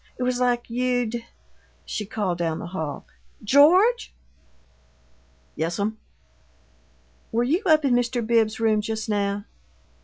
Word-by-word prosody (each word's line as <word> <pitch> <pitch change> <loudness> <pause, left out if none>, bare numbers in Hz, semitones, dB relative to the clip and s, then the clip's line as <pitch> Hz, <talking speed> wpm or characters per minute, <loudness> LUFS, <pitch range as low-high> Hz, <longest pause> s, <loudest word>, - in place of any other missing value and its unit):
It 250 - -3
was 250 0 0
like 245 -1 +1
you'd 245 -1 -1 0.3
" - - -38 0.3
She 210 - -4
called 195 -5 -2
down 165 -2 -1
the - - -6
hall, 160 -5 -5 0.4
"George!" 350 - +4 1.4
"Yes'm?" 200 +7 -2 1.3
"Were 235 +2 +1
you 310 +10 +1
up 310 -2 +4
in 260 - +3
Mr. 245 -1 0
Bibbs's 220 -1 +2
room 220 -2 +2
just 220 0 -4
now?" 205 -1 -1
225 Hz, 125 wpm, -24 LUFS, 205-250 Hz, 1.4 s, George